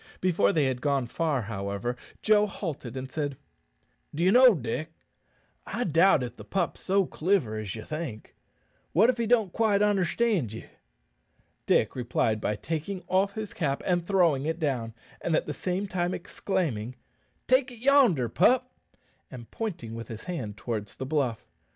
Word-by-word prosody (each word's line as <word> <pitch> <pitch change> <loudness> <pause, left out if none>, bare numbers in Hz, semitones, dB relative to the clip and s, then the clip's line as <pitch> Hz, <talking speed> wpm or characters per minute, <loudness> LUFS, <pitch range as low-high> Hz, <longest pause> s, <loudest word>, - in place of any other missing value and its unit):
Before 165 - +3
they 150 -3 +2
had 130 -2 -1
gone 140 -3 +1
far, 140 0 -1
however, 100 +2 -3 0.3
Joe 210 -1 +4
halted, 145 - -5
and 130 0 -6
said, 145 -4 -3 0.8
"D'ye 175 +5 +3
know, 250 -1 +7
Dick, 135 +3 -4 0.8
I 245 - -2
doubt 165 - +4
if 120 0 -6
the - - -9
pup's 190 -3 -2
so 195 0 +2
cliver 165 - 0
as 105 -1 -5
ye 110 - -7
think. 155 -9 -6 0.6
What 220 - +6
if 245 - -10
he 230 - 0
don't 220 -6 +2
quite 210 -3 +2
onderstand 200 - +1
ye?" 110 - -8 1.0
Dick - - +3
replied 115 -3 0
by 105 - 0
taking 165 - -4
off 195 +2 +1
his 215 -2 -5
cap 140 -5 -1
and 175 -2 +1
throwing 170 -8 +3
it 160 +1 -1
down, 125 -8 -2 0.3
at 160 -2 +1
the 150 - -4
same 185 +5 -2
time 180 -1 -1
exclaiming, 160 - -3 0.5
"Take 260 +1 +4
it 245 - -11
yonder, 240 - +4
pup," 250 - +3 0.6
and 120 -3 -10
pointing 170 - -4
with 115 -1 -7
his 110 -2 -8
hand 125 - -5
towards 110 -4 -4
the 130 - -5
bluff. 130 -6 -1
160 Hz, 160 wpm, -27 LUFS, 120-195 Hz, 1.0 s, know